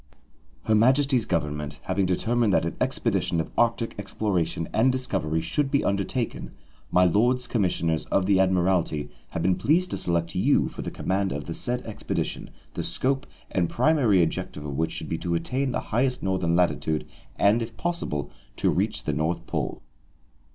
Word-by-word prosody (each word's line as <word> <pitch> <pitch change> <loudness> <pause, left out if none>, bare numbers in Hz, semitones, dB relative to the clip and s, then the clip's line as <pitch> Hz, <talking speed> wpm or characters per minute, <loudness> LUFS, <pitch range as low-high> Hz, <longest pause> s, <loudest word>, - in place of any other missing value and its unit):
"Her 110 - +1
Majesty's 130 +2 +4
Government, 75 -2 -2
having 95 -2 0
determined 110 +4 +1
that - - +3
an - - -3
expedition 85 - 0
of 80 - -3
Arctic 115 0 +1
exploration 95 -5 -1
and 125 +4 +4
discovery 95 -11 -1
should 140 - 0
be 140 0 +2
undertaken, 100 +5 -2 0.4
My 90 0 +4
Lords 120 +8 +3
Commissioners 85 -8 0
of 95 - +1
the 95 -1 +3
Admiralty 90 -5 +1 0.2
have 80 - -3
been 95 - +4
pleased 175 - +1
to - - -1
select 85 0 -1
you 90 - +2
for - - -7
the - - -4
command 95 0 -1
of 75 +1 -3
the 85 - -5
said 125 +7 -2
expedition, 110 - -3 0.2
the - - -3
scope 135 +1 0 0.2
and 90 -3 +1
primary 120 - +3
object 80 - -3
of 75 - -6
which 80 +3 0
should - - -6
be - - -3
to 85 -1 -1
attain 130 +11 -1
the - - -1
highest 125 +2 +1
northern 95 -3 +1
latitude 80 -3 +1 0.3
and, 105 +4 +3
if 115 -1 -6
possible, 170 - -2 0.2
to - - +1
reach - - 0
the 75 - -1
North 80 +3 -1
Pole." - - -3
95 Hz, 170 wpm, -26 LUFS, 85-120 Hz, 0.4 s, Majesty's